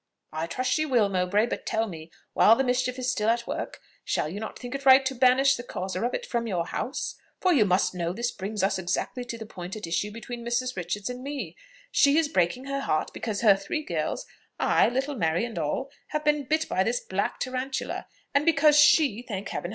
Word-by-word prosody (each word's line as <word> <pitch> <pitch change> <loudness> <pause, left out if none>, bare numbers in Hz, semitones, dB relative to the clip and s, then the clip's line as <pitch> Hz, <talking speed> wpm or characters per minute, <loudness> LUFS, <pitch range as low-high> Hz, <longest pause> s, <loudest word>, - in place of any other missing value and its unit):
"I 160 +1 -2
trust 255 +9 -2
she 310 - +2
will, 245 -9 +2
Mowbray; 190 +3 +2
but 240 - -4
tell 225 0 0
me, 160 -4 -9 0.2
while 225 - +6
the 270 - +1
mischief 250 0 0
is 255 0 0
still 215 -3 0
at 235 +1 +1
work, - - -5 0.2
shall - - -1
you 185 +6 -5
not 220 - -6
think 245 +1 -7
it 275 0 -4
right 265 0 +7
to 265 - 0
banish 265 +2 +4
the 245 - -5
causer 185 -4 -4
of 240 - 0
it - - -4
from 235 - -2
your 175 -5 -1
house? 255 - -3 0.3
For 370 -1 +3
you 240 -9 +4
must 185 -1 +2
know 170 -2 -2
this 235 +6 -2
brings 205 +1 -4
us 195 0 +1
exactly 190 +7 -2
to 235 -1 -5
the 220 - -7
point 185 -2 -7
at 215 - -5
issue 170 +5 -1
between 235 +2 -7
Mrs. 245 +2 -1
Richards 195 +6 -3
and 250 0 -7
me. 280 0 -5 0.4
She 285 +1 +4
is 320 -2 +2
breaking 250 - 0
her 275 0 -2
heart 155 - -1
because 215 -3 -3
her 210 -4 +7
three 250 +11 -4
girls - - -3 0.3
ay, - - +4
little 265 +4 -1
Mary 170 -1 +1
and 225 -7 -5
all 165 - -2 0.2
have 305 0 -3
been 295 -1 +2
bit 315 +4 0
by 190 - +1
this 235 +4 0
black 195 +1 -2
tarantula; 255 +1 -3 0.3
and 280 +1 +3
because 300 -2 +5
she 295 -6 +5
(thank 205 -5 -5
Heaven!) 175 - -4
235 Hz, 225 wpm, -27 LUFS, 195-270 Hz, 0.4 s, right